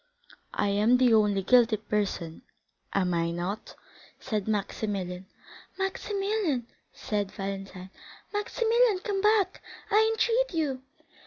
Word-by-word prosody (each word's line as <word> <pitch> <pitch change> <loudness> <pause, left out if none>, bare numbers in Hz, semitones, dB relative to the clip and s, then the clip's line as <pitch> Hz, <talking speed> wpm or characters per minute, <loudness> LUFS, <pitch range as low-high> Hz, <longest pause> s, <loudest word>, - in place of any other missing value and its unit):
"I 205 - +1
am 210 +5 +4
the 250 -2 +4
only 205 -3 +3
guilty 235 0 +5
person, 205 -6 -3 0.5
am 185 -2 +1
I 170 0 +1
not?" 175 +5 -4 0.4
said 215 -5 -3
Maximilian. 195 -3 -2 0.5
"Maximilian!" 390 - -1 0.3
said 205 -2 -3
Valentine, 195 -1 -6 0.4
"Maximilian, 455 +1 +2
come 405 -4 -1
back, 420 -3 +2 0.3
I 440 +2 +5
entreat 465 -1 +1
you!" 280 -5 -1
220 Hz, 105 wpm, -28 LUFS, -, 0.5 s, guilty